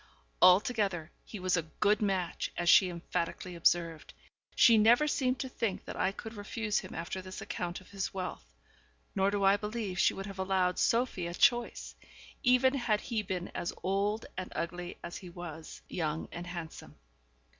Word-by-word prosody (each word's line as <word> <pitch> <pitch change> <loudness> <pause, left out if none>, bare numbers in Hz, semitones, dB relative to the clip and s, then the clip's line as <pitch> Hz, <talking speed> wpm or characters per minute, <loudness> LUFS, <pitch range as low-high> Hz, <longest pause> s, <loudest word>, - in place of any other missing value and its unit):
Altogether, 190 -3 +4
he 210 - -8
was 185 -1 +1
a 165 - +1 0.2
good 210 +1 +3
match, 190 -4 -1
as 175 - -1
she 185 +1 +7
emphatically 170 +1 -4
observed. 165 -1 +1 0.4
She 230 - +7
never 235 +7 +5
seemed 260 -3 +1
to 265 - -3
think 230 -6 -3
that - - -6
I 190 - +1
could 220 +3 -8
refuse 210 0 -2
him - - -9
after 170 +3 -4
this 185 0 -8
account 175 +1 -4
of 185 - -18
his 195 -1 -3
wealth, 185 - -5 0.7
nor 195 +1 +2
do 200 -1 -1
I 195 +1 +5
believe 210 -3 -4
she - - +4
would 195 - -5
have 195 -1 -8
allowed 190 -1 +1
Sophie 230 -7 +1
a 170 - -5
choice, 240 +4 +2 0.5
even 255 +1 +4
had 240 -6 +1
he 225 -2 -2
been 185 -3 -4
as 175 - -4
old 200 +3 0
and 185 0 -5
ugly 175 +1 -4
as 170 - -6
he 185 - -10
was 170 -2 -9
young 160 -2 -2
and 175 +1 -7
handsome. 170 -3 -8
190 Hz, 175 wpm, -31 LUFS, 175-215 Hz, 0.7 s, she